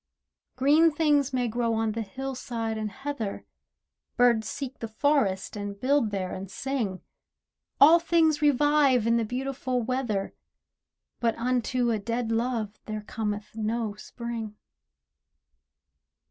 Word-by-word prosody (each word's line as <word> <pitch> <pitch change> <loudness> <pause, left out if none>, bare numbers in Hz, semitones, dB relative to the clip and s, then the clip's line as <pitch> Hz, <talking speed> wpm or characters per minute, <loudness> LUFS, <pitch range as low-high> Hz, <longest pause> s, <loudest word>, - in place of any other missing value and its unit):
Green 295 +5 +5
things 295 -3 +2
may 250 -2 0
grow 230 0 0
on 220 0 0
the 225 +1 -3
hillside 245 -2 -4
and 215 -1 -3
heather, 235 -2 -5 0.7
Birds 235 -3 +3
seek 275 -2 -6
the 230 - -4
forest 220 -6 +1
and 205 -1 -5
build 265 -1 +2
there 190 -3 -3
and 190 0 -6
sing. 215 -3 -3 0.8
All 320 +5 +8
things 330 -2 +2
revive 290 -4 +4
in 230 0 +3
the 230 - +1
beautiful 255 +1 -2
weather, 235 -5 -2 0.9
But 230 -1 +1
unto 245 0 0
a 220 - 0
dead 230 +2 -2
love 225 -2 -1
there 215 -1 -4
cometh 210 -1 -4
no 220 0 -1
Spring. 225 0 -6
235 Hz, 125 wpm, -27 LUFS, 215-270 Hz, 0.9 s, All